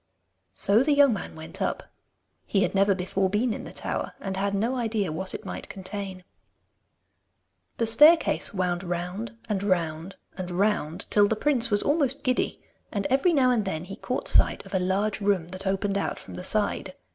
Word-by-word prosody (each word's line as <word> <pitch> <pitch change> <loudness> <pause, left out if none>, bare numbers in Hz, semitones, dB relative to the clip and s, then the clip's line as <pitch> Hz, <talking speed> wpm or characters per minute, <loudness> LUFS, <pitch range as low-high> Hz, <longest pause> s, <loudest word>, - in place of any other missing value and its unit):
So 200 - +4
the 290 +2 +2
young 285 -3 +6
man 200 - -6
went 160 0 -8
up. - - -3 0.6
He 195 -1 +2
had - - -1
never 195 0 +3
before 190 +1 -1
been 220 +4 0
in - - -7
the - - -9
tower, - - -3
and 195 -1 -4
had 200 +1 -1
no 230 +6 0
idea 220 -7 -1
what 185 +4 -4
it - - -8
might - - -7
contain. 190 -1 -6 1.5
The 230 - +1
staircase 300 +9 +6
wound 180 -4 -1
round 180 +6 -4
and 205 -3 -1
round 170 -2 -1 0.2
and 185 -1 -5
round, 180 -2 0
till 205 -1 +5
the 220 - 0
prince 255 0 +1
was 205 -1 +1
almost 285 -2 0
giddy, 255 -1 -1 0.3
and 200 -2 -2
every 275 +7 +3
now 265 -5 +4
and 235 -4 +1
then 165 -5 -3
he 195 +2 -8
caught 255 - -4
sight - - +3
of - - -12
a 190 - +2
large 195 +4 0
room 195 -4 +1
that 185 +1 -7
opened 195 +1 0
out - - -2
from - - -10
the 180 - -7
side. 195 -1 -1
200 Hz, 190 wpm, -26 LUFS, 185-230 Hz, 1.5 s, young